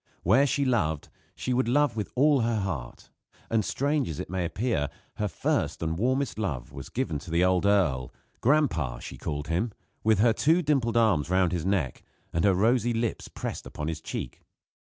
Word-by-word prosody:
Where 125 Hz, +11 st, +5 dB
she 140 Hz, +1 st, +1 dB
loved 80 Hz, -, 0 dB, 0.3 s
she 130 Hz, -, -2 dB
would 125 Hz, -1 st, +1 dB
love 145 Hz, 0 st, +3 dB
with 105 Hz, -2 st, -3 dB
all 140 Hz, +1 st, +4 dB
her 115 Hz, -1 st, +1 dB
heart; 75 Hz, -11 st, -5 dB, 0.4 s
and 110 Hz, -1 st, +2 dB
strange 140 Hz, -, 0 dB
as 80 Hz, -, -5 dB
it -, -, -6 dB
may 95 Hz, -2 st, -1 dB
appear, 85 Hz, -, -1 dB, 0.3 s
her 105 Hz, -, 0 dB
first 85 Hz, -1 st, -1 dB
and 80 Hz, 0 st, -1 dB
warmest 130 Hz, +5 st, 0 dB
love 75 Hz, -, -3 dB
was 70 Hz, -, -8 dB
given 115 Hz, -, -2 dB
to 85 Hz, -, -11 dB
the 85 Hz, +2 st, +2 dB
old 95 Hz, +1 st, +2 dB
earl 80 Hz, -12 st, +2 dB, 0.3 s
"Gran'pa," 115 Hz, -, +2 dB
she -, -, -9 dB
called 75 Hz, +1 st, -4 dB
him, 90 Hz, +8 st, 0 dB, 0.3 s
with 110 Hz, -1 st, +4 dB
her 115 Hz, +3 st, +4 dB
two 165 Hz, +9 st, +3 dB
dimpled 130 Hz, -6 st, +1 dB
arms 100 Hz, -10 st, +3 dB
round 95 Hz, -2 st, +3 dB
his 90 Hz, -1 st, -2 dB
neck 90 Hz, -10 st, 0 dB, 0.3 s
and 85 Hz, -, +1 dB
her 100 Hz, -2 st, +4 dB
rosy 120 Hz, +4 st, +2 dB
lips 115 Hz, 0 st, -2 dB
pressed -, -, -6 dB
upon 75 Hz, -, -5 dB
his 80 Hz, -1 st, -4 dB
cheek. -, -, -6 dB
105 Hz, 190 wpm, -27 LUFS, 80-125 Hz, 0.4 s, Where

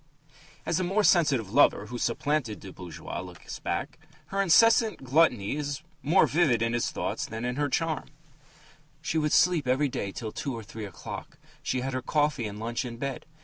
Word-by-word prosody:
As 165 Hz, -, +1 dB
the 185 Hz, -, 0 dB
more 195 Hz, +4 st, +1 dB
sensitive 145 Hz, -, +3 dB
lover 145 Hz, -, +5 dB
who 120 Hz, 0 st, -6 dB
supplanted 120 Hz, -1 st, -1 dB
the 95 Hz, -, -10 dB
bourgeois 90 Hz, -4 st, -7 dB
looks 90 Hz, -1 st, -9 dB
back, -, -, -3 dB, 0.3 s
her 195 Hz, 0 st, 0 dB
incessant 220 Hz, -, +5 dB
gluttony 130 Hz, -6 st, +3 dB
is 145 Hz, -2 st, -3 dB, 0.2 s
more 165 Hz, +7 st, +4 dB
vivid 140 Hz, -8 st, +2 dB
in 115 Hz, 0 st, 0 dB
his 120 Hz, -, 0 dB
thoughts -, -, -3 dB
than 110 Hz, +1 st, -6 dB
her 145 Hz, +1 st, 0 dB
charm: 160 Hz, +2 st, -1 dB, 0.9 s
She 160 Hz, -, 0 dB
would 150 Hz, -1 st, 0 dB
sleep 155 Hz, -2 st, +4 dB
every 135 Hz, +3 st, +2 dB
day 100 Hz, -5 st, -3 dB
till 110 Hz, +2 st, -5 dB
two 135 Hz, +2 st, -4 dB
or 115 Hz, -, -7 dB
three 110 Hz, +1 st, -7 dB
o'clock; 95 Hz, -, -8 dB, 0.2 s
she 130 Hz, -, -1 dB
had 135 Hz, +1 st, -3 dB
her 130 Hz, -, -1 dB
coffee 145 Hz, -4 st, +1 dB
and 105 Hz, 0 st, -7 dB
lunch 115 Hz, +3 st, -2 dB
in 120 Hz, -2 st, -6 dB
bed. 135 Hz, +2 st, -4 dB
135 Hz, 185 wpm, -28 LUFS, 115-155 Hz, 0.9 s, lover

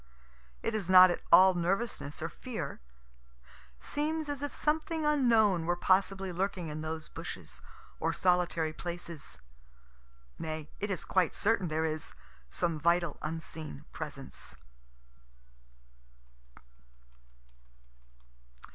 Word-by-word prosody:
It 225 Hz, -, -1 dB
is 205 Hz, -5 st, -2 dB
not 185 Hz, -1 st, +9 dB
at -, -, -3 dB
all 190 Hz, 0 st, +9 dB
nervousness 175 Hz, -4 st, -2 dB
or 165 Hz, -, -2 dB
fear. 170 Hz, -, -6 dB, 1.0 s
Seems 305 Hz, -, -2 dB
as 285 Hz, -1 st, -3 dB
if 290 Hz, -, -2 dB
something 315 Hz, +1 st, 0 dB
unknown 225 Hz, -, +4 dB
were 175 Hz, -, +2 dB
possibly 190 Hz, +1 st, +2 dB
lurking 180 Hz, -2 st, -2 dB
in 150 Hz, +1 st, -5 dB
those 160 Hz, 0 st, -4 dB
bushes, -, -, -8 dB, 0.4 s
or 165 Hz, -, +1 dB
solitary 175 Hz, -3 st, +1 dB
places. 170 Hz, -2 st, -7 dB, 1.0 s
Nay, 155 Hz, -1 st, -5 dB
it 205 Hz, -, -2 dB
is 190 Hz, -4 st, -3 dB
quite 185 Hz, -3 st, +2 dB
certain 205 Hz, -4 st, +2 dB
there 160 Hz, 0 st, 0 dB
is 155 Hz, -1 st, -4 dB, 0.3 s
some 160 Hz, -, -1 dB
vital 170 Hz, 0 st, +2 dB
unseen 155 Hz, -, -6 dB
presence. -, -, -6 dB
180 Hz, 105 wpm, -31 LUFS, 160-205 Hz, 1.0 s, not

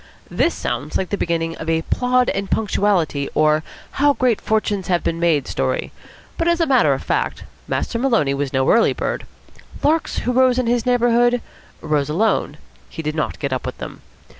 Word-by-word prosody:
This -, -, +1 dB
sounds 150 Hz, +3 st, -3 dB
like 190 Hz, -, -3 dB
the -, -, +1 dB
beginning 165 Hz, -3 st, -1 dB
of 160 Hz, -, -5 dB
a 165 Hz, 0 st, +1 dB
"Plod 250 Hz, +4 st, +1 dB
and 195 Hz, 0 st, -3 dB
Punctuality," 190 Hz, -9 st, 0 dB
or 155 Hz, 0 st, +3 dB, 0.3 s
"How 285 Hz, +1 st, +3 dB
Great 250 Hz, -5 st, +1 dB
Fortunes 210 Hz, -3 st, -1 dB
have 175 Hz, -2 st, +1 dB
been 165 Hz, -, -1 dB
Made" 160 Hz, -5 st, +2 dB
story; -, -, -2 dB, 0.5 s
but, 335 Hz, -, +1 dB
as 340 Hz, 0 st, +2 dB
a 330 Hz, -, +3 dB
matter 265 Hz, -4 st, +4 dB
of -, -, -4 dB
fact, -, -, -1 dB, 0.2 s
Master 230 Hz, -, -2 dB
Maloney 230 Hz, -, +2 dB
was 140 Hz, -1 st, -2 dB
no 130 Hz, 0 st, +1 dB
early 230 Hz, -, +4 dB
bird. -, -, -3 dB, 0.6 s
Larks 315 Hz, +2 st, +1 dB
who 250 Hz, -, -1 dB
rose 255 Hz, 0 st, +3 dB
in 255 Hz, -, +1 dB
his 240 Hz, 0 st, 0 dB
neighbourhood, 240 Hz, 0 st, +3 dB, 0.4 s
rose 150 Hz, -2 st, 0 dB
alone. 180 Hz, -3 st, 0 dB, 0.3 s
He 160 Hz, -, -7 dB
did 150 Hz, 0 st, -2 dB
not 155 Hz, -1 st, -2 dB
get 140 Hz, -2 st, -3 dB
up 130 Hz, -, -2 dB
with -, -, -5 dB
them. -, -, -8 dB
200 Hz, 190 wpm, -20 LUFS, 155-245 Hz, 0.6 s, matter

